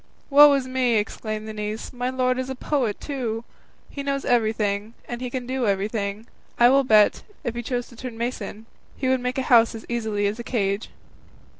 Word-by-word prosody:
"Woe 290 +1 +9
is 270 -2 0
me!" 255 -2 +1
exclaimed 215 0 -2
the 220 - -5
niece, 210 +1 -5
"my 245 0 -2
lord 255 0 0
is 260 0 -3
a 265 - -3
poet, 255 -5 -1
too! 240 -6 -3 0.4
He 280 - -6
knows 275 0 -2
everything, 220 -2 0
and 240 0 -5
he 250 - -3
can 250 0 -4
do 255 -1 -1
everything; 200 +1 -1 0.3
I 240 0 +7
will 275 +1 +5
bet, 215 -4 +4 0.2
if 240 - -2
he 240 - -4
chose 245 +1 -3
to 235 - -14
turn 240 -1 -7
mason, 225 -2 -4 0.3
he 270 - -3
could 260 -1 +2
make 250 +1 -2
a 265 - 0
house 230 -2 +5
as 220 - -8
easily 220 -4 -1
as 205 +3 -1
a - - -4
cage." 200 -4 -1
240 Hz, 200 wpm, -24 LUFS, 215-255 Hz, 0.4 s, Woe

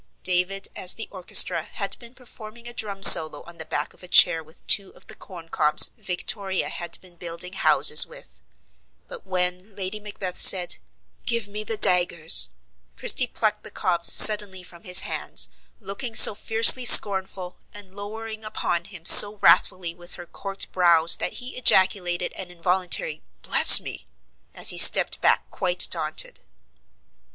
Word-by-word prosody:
David 185 +2 -3
as 185 - -1
the 225 - -11
orchestra, 180 -2 +1
had 200 +5 -9
been 235 +1 -16
performing 235 -2 -15
a 240 - -10
drum 200 -4 -8
solo 160 -2 +6
on 170 0 -18
the 160 - -9
back 150 -1 -8
of - - -18
a 180 - -12
chair 175 -2 +2
with 155 +1 -24
two 200 -2 +1
of - - -17
the - - -12
corn 180 -5 -17
cobs 155 -2 +2
Victoria 190 +1 -6
had 175 - -8
been 180 -2 -17
building 175 +2 -9
houses 150 -4 +2
with; - - -17 0.7
but, - - -14
when 180 +2 -5
Lady 195 +2 -8
Macbeth 200 -3 -10
said, 180 -2 +3 0.5
"Give 235 -4 -3
me 210 +1 -9
the 220 +1 -7
daggers," 175 - +1 0.5
Christie 250 - -1
plucked 215 -2 -5
the - - -9
cobs 170 -2 0
suddenly 205 -3 +5
from 175 -1 -18
his 180 +1 +4
hands, - - -2 0.3
looking 220 +3 -10
so - - +7
fiercely 225 +4 +3
scornful, 190 -5 +3
and 205 -2 -14
lowering 220 +2 -12
upon 175 -5 -7
him 190 -4 -15
so 205 +3 +8
wrathfully 185 -3 -1
with 175 +1 -10
her 175 - -14
corked 195 +3 -9
brows 170 -2 0
that - - -7
he 250 +1 -11
ejaculated 185 -6 -1
an 185 - -11
involuntary, 175 -3 -4 0.2
"Bless - - +5
me!" - - -14 0.5
as - - 0
he - - 0
stepped - - +4
back - - -2
quite - - -4
daunted. - - -4
185 Hz, 160 wpm, -19 LUFS, 175-210 Hz, 0.7 s, so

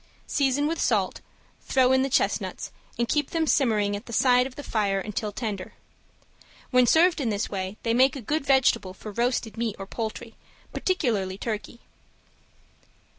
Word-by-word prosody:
Season 280 0 +1
with 325 +2 -1
salt, - - +1 0.4
throw 260 -1 +3
in 260 0 +4
the 270 - 0
chestnuts - - -1 0.3
and 235 - 0
keep 295 +1 0
them 325 -1 0
simmering 215 -9 +2
at 205 +4 -8
the - - -8
side 250 +2 +4
of 260 - -13
the 290 - -8
fire 200 -5 0
until 210 +1 -3
tender. 205 -4 -5 1.0
When 250 -1 +5
served 330 +2 +4
in 245 - 0
this 205 -1 -2
way 190 +1 -4
they 230 - +1
make 260 +3 +4
a 270 - -6
good 300 +7 -1
vegetable 265 -9 +2
for 215 - -8
roasted 235 0 -1
meat 230 -2 -2
or 195 - -6
poultry, 225 +2 -5 0.4
particularly 215 - -1
turkey. 230 +2 -5
235 Hz, 165 wpm, -26 LUFS, 210-270 Hz, 1.0 s, When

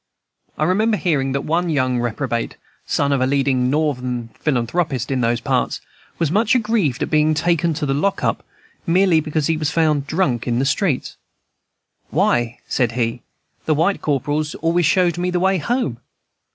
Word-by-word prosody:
I - - 0
remember 210 +6 +2
hearing 140 -8 0
that 140 - -1
one 170 +3 0
young 130 -5 +1
reprobate, 120 0 -2 0.3
son 140 0 +1
of 140 -2 +1
a 130 - +2
leading 135 -2 +1
Northern 125 -5 -1
philanthropist 135 +1 -1
in 130 -2 0
those 120 0 +1
parts, - - -1 0.4
was 165 -3 0
much 225 +6 +2
aggrieved 210 - +1
at - - -4
being 155 0 +3
taken 170 0 +1
to 150 - -2
the 135 - 0
lock 195 +8 0
up - - 0 0.4
merely 180 -1 +4
because 155 -1 -1
he 160 +1 +1
was 155 -2 -1
found 155 -4 +1
drunk 145 -10 0
in 120 -1 +1
the 130 - +1
streets. 150 -1 -1 0.9
"Why," 120 -1 +1
said 120 -3 0
he, 120 0 -1 0.4
"the 155 - +2
white 170 +6 +1
corporals 150 +1 -1
always 165 0 +1
showed 175 +1 +2
me 180 +1 0
the 180 0 0
way 190 +1 +2
home." 160 - -1
150 Hz, 170 wpm, -20 LUFS, 130-175 Hz, 0.9 s, merely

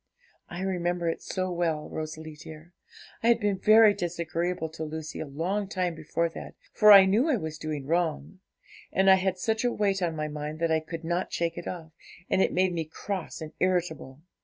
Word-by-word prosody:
I 175 +1 -6
remember 175 -2 -1
it 165 - -3
so 185 -1 -3
well, 165 -3 -1
Rosalie 155 0 -6
dear; 155 +3 -12 0.5
I 230 - 0
had 235 0 +5
been 205 -3 0
very 215 +1 +7
disagreeable 170 -2 -2
to 160 0 -7
Lucy 155 0 -6
a 155 - -4
long 180 +8 -2
time 180 -3 -1
before 165 +1 -1
that, - - -9 0.2
for 210 -1 +7
I 195 -2 +10
knew 220 +11 +2
I 290 - +3
was 160 -6 -5
doing 150 -3 -4
wrong, 170 +3 -1 0.5
and 190 0 +4
I - - +9
had 185 0 -1
such 220 +5 -1
a 245 - +2
weight 200 -3 0
on 170 -2 -1
my 155 -1 -2
mind 150 +1 -5
that 165 0 0
I 160 - +3
could 160 +1 -8
not 175 +3 -2
shake 170 0 -1
it 175 - -7
off, 165 -3 -6 0.4
and 190 - +3
it - - +2
made 185 0 +1
me 165 -2 -2
cross 185 +3 -6
and 155 -1 -6
irritable. 160 -6 -1
170 Hz, 205 wpm, -27 LUFS, 160-190 Hz, 0.5 s, I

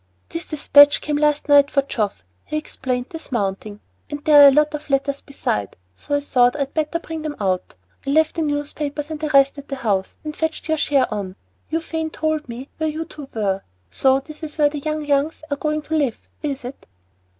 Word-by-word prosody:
"This 335 - -6
despatch 290 -1 +6
came 295 -1 -2
last 300 0 +1
night 285 -1 +6
for 275 -2 +2
Geoff," 215 - -2 0.2
he 305 - -3
explained, 255 -4 -3
dismounting, 210 - -4 0.3
"and 290 0 -6
there 300 -2 +8
were 285 - +11
a - - +8
lot 300 +2 +3
of 300 0 -6
letters 275 0 0
besides, 105 - -3 0.2
so 285 - -3
I 285 - +1
thought 245 -3 +3
I'd 280 -2 -2
better 310 +1 0
bring 325 -1 -6
them 305 -1 -4
out. 185 -3 -1 0.3
I - - 0
left 315 +2 +3
the 330 - -2
newspapers 295 0 -3
and 310 - -4
the 305 0 -2
rest 275 0 +4
at 285 - -11
the 275 - -4
house, 200 -7 -1
and 305 -1 -5
fetched 320 0 -2
your 315 -1 +1
share 275 -3 +3
on. 195 -3 -4 0.3
Euphane 320 0 -2
told 310 -3 -2
me 245 +3 -7
where 315 0 +1
you 315 +2 -4
two 290 -4 -10
were. 195 -3 0 0.3
So 265 0 +3
this 305 +3 -12
is 310 -2 -7
where 295 -1 +4
the 295 0 -5
young 305 +1 -3
Youngs 290 +2 0
are 285 - 0
going 305 0 -1
to 320 - -2
live, 280 -7 -1
is 280 -3 -3
it?" 255 +2 -9
290 Hz, 210 wpm, -21 LUFS, 265-305 Hz, 0.3 s, were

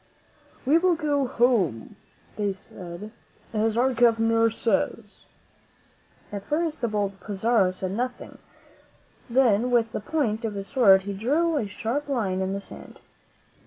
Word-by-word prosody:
"We 300 +6 +5
will 360 0 +3
go 290 -4 0
home," 230 - +1 0.4
they 205 -2 -1
said, 185 +1 -9 0.4
"as 220 +1 0
our 260 +2 +3
Governor 230 -1 +3
says." 225 +1 -2 1.1
At 200 -1 -6
first 315 +1 -1
the 235 - +1
bold 200 -2 -2
Pizarro 205 +1 +1
said 185 0 -4
nothing; 250 +3 -4 0.9
then 240 -2 +3
with 235 -2 +2
the - - -3
point 225 -3 -1
of 220 -2 -3
his 195 -1 -5
sword 195 -8 +5
he 200 +1 -4
drew 300 - +1
a 230 -8 -1
sharp 245 +8 -3
line 200 -8 -1
in 190 0 -1
the 200 - -2
sand. 200 - -11
225 Hz, 140 wpm, -25 LUFS, 200-255 Hz, 1.1 s, We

